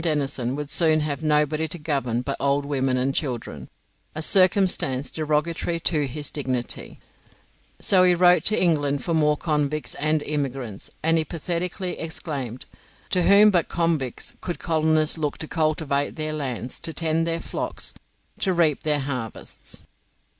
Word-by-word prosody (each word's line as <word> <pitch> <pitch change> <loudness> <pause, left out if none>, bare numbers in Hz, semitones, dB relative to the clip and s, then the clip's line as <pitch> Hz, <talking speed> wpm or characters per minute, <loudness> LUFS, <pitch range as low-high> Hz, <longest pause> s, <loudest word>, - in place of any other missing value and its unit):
Denison 140 -6 0
would 150 0 -4
soon 160 -2 +3
have 150 0 -3
nobody 155 0 +2
to 160 - -5
govern 135 -7 -1
but 140 +1 -2
old 140 0 +1
women 135 -2 0
and 130 +2 0
children, 130 -6 -3 0.5
a 155 - -2
circumstance 185 -8 +4
derogatory 160 +2 -1
to 150 -4 +1
his 145 +3 -5
dignity, 130 -4 -3 0.8
so 190 -2 +4
he 180 -1 +5
wrote 180 0 +5
to 215 - +3
England 145 -5 +1
for 170 - -1
more 150 -2 +3
convicts 150 -1 -1
and 155 0 0
immigrants, 135 -8 -4
and 165 +1 +3
he - - +1
pathetically 175 +3 -4
exclaimed, 140 -7 -5 0.5
"To 180 - +3
whom 205 +3 +7
but 175 -4 +2
convicts 165 -7 -1
could 175 - -4
colonists 155 -1 +1
look 150 -2 -2
to 155 - -5
cultivate 155 -3 0
their 155 -1 -3
lands, 130 -4 -4
to 165 - -4
tend 165 0 0
their 165 0 -1
flocks, - - -4 0.5
to 190 - +1
reap 160 -4 +2
their 150 -2 +1
harvests?" 130 -5 -6
155 Hz, 150 wpm, -24 LUFS, 140-165 Hz, 0.8 s, whom